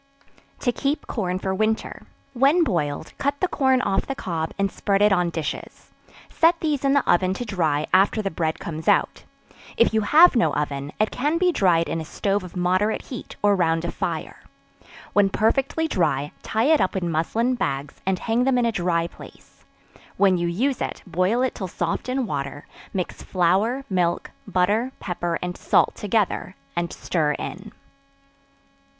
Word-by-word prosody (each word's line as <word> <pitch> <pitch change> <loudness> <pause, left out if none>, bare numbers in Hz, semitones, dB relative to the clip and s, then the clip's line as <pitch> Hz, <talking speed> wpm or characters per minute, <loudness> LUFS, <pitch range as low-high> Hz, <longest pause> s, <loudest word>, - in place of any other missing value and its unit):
To 245 - +2
Keep 285 +4 -2
Corn 185 -5 -2
for 190 0 -2
Winter. 215 +3 -2 0.3
When 275 +7 +4
boiled, 155 - -2
cut 280 0 -1
the 370 - +1
corn 265 -5 +2
off 195 - 0
the 275 - -3
cob, 165 -8 -3
and 195 -1 0
spread 200 -1 0
it 205 0 +5
on 180 -2 +2
dishes; 160 -3 -6 0.4
set 335 +1 +3
these 295 -4 -1
in 275 0 +3
the 280 - +2
oven 185 +1 +3
to 245 - -4
dry 160 -8 0
after 195 +3 +4
the 195 -2 -2
bread 160 -1 -1
comes 160 -1 -7
out. - - +2 0.5
If 230 - +4
you 220 - +3
have 310 +10 +6
no 235 - +2
oven, 145 -1 -3
it 215 - +2
can 295 +6 0
be 360 +1 +3
dried 175 - +2
in 165 - -2
a - - -7
stove 200 +4 -1
of 180 - -10
moderate 185 +4 +1
heat, 250 - -8
or 205 -1 +5
round 165 -2 +1
a 170 - -2
fire. - - -4 0.7
When 205 -1 +4
perfectly 270 +10 +1
dry, 145 - 0
tie 220 +1 -1
it 310 - +3
up 190 - 0
in 175 -3 -1
muslin 220 +10 0
bags, 140 - -3
and 190 0 0
hang 230 +5 0
them 265 -1 +2
in 245 - +2
a 230 - +2
dry 175 -4 0
place; 170 - -14 0.5
when 195 -2 +4
you 175 -1 -1
use 245 +10 -1
it, - - -4
boil 185 +7 +1
it 260 - 0
till 190 - -5
soft 175 +7 -3
in 260 0 0
water; 140 -5 -4 0.3
mix 185 -2 -4
flour, 200 +9 +1
milk, 175 -3 0 0.2
butter, 210 +8 +1
pepper 175 -2 -2
and 180 0 -3
salt - - +2
together, 205 -3 -1 0.2
and 170 0 -1
stir 155 -4 0
in. - - -7
195 Hz, 180 wpm, -23 LUFS, 170-245 Hz, 0.7 s, have